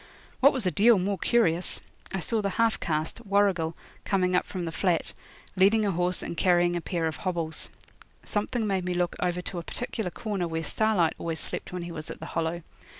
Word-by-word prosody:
What 280 +2 +7
was 260 -7 -2
a 180 - +2
deal 215 +7 +6
more 195 +1 -1
curious, 180 -8 +2 0.3
I 190 - -2
saw 220 +7 +1
the 200 - 0
half 225 +3 +2
caste, 155 +8 -2
Warrigal, 195 -6 +2 0.3
coming 185 -2 +1
up 180 - +2
from 180 -3 -4
the 165 - -3
flat, 175 -1 0 0.4
leading 205 +3 +4
a 200 - +2
horse 180 +1 0
and - - -4
carrying 175 0 +3
a 175 - -1
pair 170 -1 -2
of 160 -1 -2
hobbles. 165 -4 -2 0.6
Something 215 +2 -1
made 195 -3 0
me 180 0 -2
look 175 -1 0
over 180 0 -1
to 180 - -4
a - - -6
particular 220 -1 -3
corner 195 -2 -3
where 165 0 -2
Starlight 210 -4 +2
always 165 -1 -2
slept - - -2
when 180 -1 -4
he 170 - -6
was 155 -2 -7
at - - -7
the - - -7
Hollow. 165 +1 -1
180 Hz, 210 wpm, -27 LUFS, 170-205 Hz, 0.6 s, What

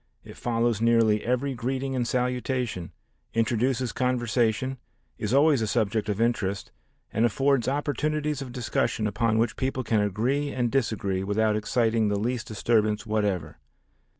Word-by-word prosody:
It - - -12
follows 115 -2 0
nearly 115 -2 +3
every 125 +3 0
greeting 130 +2 -2
and 120 -2 0
salutation, 125 -7 -1 0.4
introduces 120 +2 +1
conversation, 125 0 0 0.4
is 105 - -2
always 140 -1 +4
a 110 - 0
subject 110 -1 0
of 105 0 -1
interest 105 -4 0 0.4
and 110 - +1
affords 135 +1 +2
opportunities 150 +1 -1
of 130 -2 -6
discussion 120 -3 -1
upon 110 +1 +1
which 115 -1 +1
people 130 0 -1
can 110 -1 +1
agree 120 +9 0
and 120 -4 -1
disagree 100 -7 0
without 105 +2 +1
exciting 110 0 +1
the 105 0 0
least 120 +3 -2
disturbance 110 -1 +1
whatever. 100 -8 -1
115 Hz, 140 wpm, -26 LUFS, 110-130 Hz, 0.4 s, always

